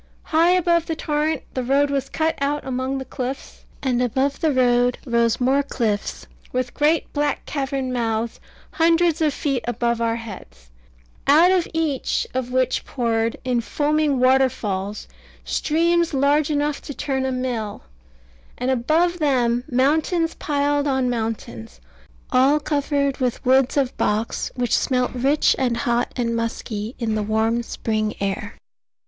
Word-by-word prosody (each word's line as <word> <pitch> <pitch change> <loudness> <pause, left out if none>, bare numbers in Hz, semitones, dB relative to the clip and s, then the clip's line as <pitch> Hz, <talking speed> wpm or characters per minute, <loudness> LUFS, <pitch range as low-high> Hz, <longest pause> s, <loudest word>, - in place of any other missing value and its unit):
High 330 +2 +3
above 340 -2 +2
the 325 - -2
torrent 305 0 -1
the 260 - -1
road 280 +3 +2
was 275 -2 -1
cut 320 0 0
out 290 +1 -1
among 260 +1 -2
the 265 - -5
cliffs, 260 +1 -6 0.2
and 250 -2 +1
above 265 +3 0
the 315 - +2
road 245 -1 +3
rose 235 -2 +1
more 265 +3 +3
cliffs, 225 -7 -2 0.3
with 250 -1 -2
great 305 +2 +1
black 290 -1 -1
cavern 270 -2 -2
mouths, 230 -1 -1 0.3
hundreds 330 0 +2
of 310 -2 +3
feet 275 -3 -2
above 235 -1 0
our 230 0 +1
heads, 180 - -10 0.6
out 320 +6 +6
of 370 -2 +2
each 320 -5 -1
of 250 -1 -2
which 255 0 +1
poured 230 -2 -1
in 245 -2 +1
foaming 295 +2 0
waterfalls 245 -7 +1 0.4
streams 330 - +1
large 285 +2 +2
enough 295 -1 0
to 285 - -8
turn 265 -2 -2
a 265 - -1
mill, 245 -5 -3 0.7
and 250 +2 0
above 320 +8 +1
them 245 -5 +1
mountains 315 +6 +1
piled 290 0 0
on 265 -2 +1
mountains, 210 - -5 0.5
all 270 +4 +4
covered 285 -2 0
with 250 -1 -2
woods 260 +2 +3
of 270 -3 +1
box, 215 +2 -1
which 245 -1 +1
smelt 250 -1 +1
rich 270 +4 +2
and 245 -3 +1
hot 235 +1 0
and 235 -2 -1
musky 230 -1 -4
in 225 -3 -1
the 215 - 0
warm 220 +2 +1
spring 215 -2 -2
air. 200 +2 -3
260 Hz, 145 wpm, -22 LUFS, 235-290 Hz, 0.7 s, out